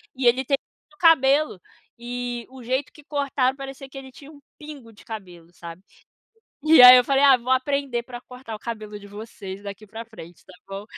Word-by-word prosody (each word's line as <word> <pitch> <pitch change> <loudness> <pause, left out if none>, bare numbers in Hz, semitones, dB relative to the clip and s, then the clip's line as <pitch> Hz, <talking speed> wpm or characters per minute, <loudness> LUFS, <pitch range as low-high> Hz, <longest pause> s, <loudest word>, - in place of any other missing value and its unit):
E 260 - -3
ele 255 +2 +3
tem 275 +1 0 0.2
muito 295 - -28
cabelo. 295 - +3 0.4
E 240 0 -5
o 260 -1 -13
jeito 260 +4 -2
que 300 - -17
cortaram, 275 -3 -1
parecia 270 0 -9
que 270 - -12
ele 265 -1 -10
tinha 280 +3 -14
um 290 - -16 0.2
pingo 290 -6 -11
de - - -18
cabelo, 180 -6 -10
sabe. 170 +1 -11 0.8
E 310 -2 +6
aí 250 0 +12
eu 250 - +4
falei: 275 +1 +1
"Ah, 270 -2 +7
vou 245 +1 -7
aprender 260 -2 -1
pra 245 -1 -9
cortar 250 -3 -10
o - - -7
cabelo 215 -2 -7
de 200 - -14
vocês, 205 -2 -9
daqui 200 +1 -9
pra 225 +3 -9
frente, 175 -7 -14
tá 185 - -16 0.2
bom?" 195 +1 -7
250 Hz, 200 wpm, -23 LUFS, 215-275 Hz, 0.8 s, aí